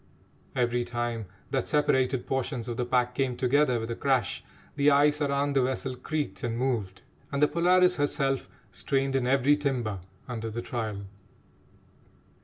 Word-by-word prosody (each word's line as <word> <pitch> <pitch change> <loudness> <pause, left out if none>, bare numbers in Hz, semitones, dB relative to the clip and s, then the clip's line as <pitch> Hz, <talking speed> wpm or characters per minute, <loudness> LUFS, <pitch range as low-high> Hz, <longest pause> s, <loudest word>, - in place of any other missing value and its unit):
Every 120 0 +1
time 120 -3 -3 0.2
that 135 -3 0
separated 130 -4 +2
portions 130 -2 -2
of 120 - -3
the 125 +1 -2
pack 125 -1 +1
came 125 -1 -1
together 130 -1 +2
with 115 +1 -4
a - - -2
crash, 130 -5 0 0.3
the 145 0 +4
ice 145 +1 +4
around 140 0 +1
the 135 - +4
vessel 130 0 -2
creaked 125 -7 -3
and 115 -1 -1
moved, 115 -7 -2 0.3
and 140 - -1
the 150 - +5
Polaris 180 +3 +4
herself 140 -2 0 0.2
strained 135 0 -1
in 130 -2 +1
every 135 +2 +4
timber 125 -9 -2 0.3
under 115 -3 -4
the 120 +2 -5
trial. 110 -4 -4
130 Hz, 155 wpm, -28 LUFS, 120-140 Hz, 0.3 s, the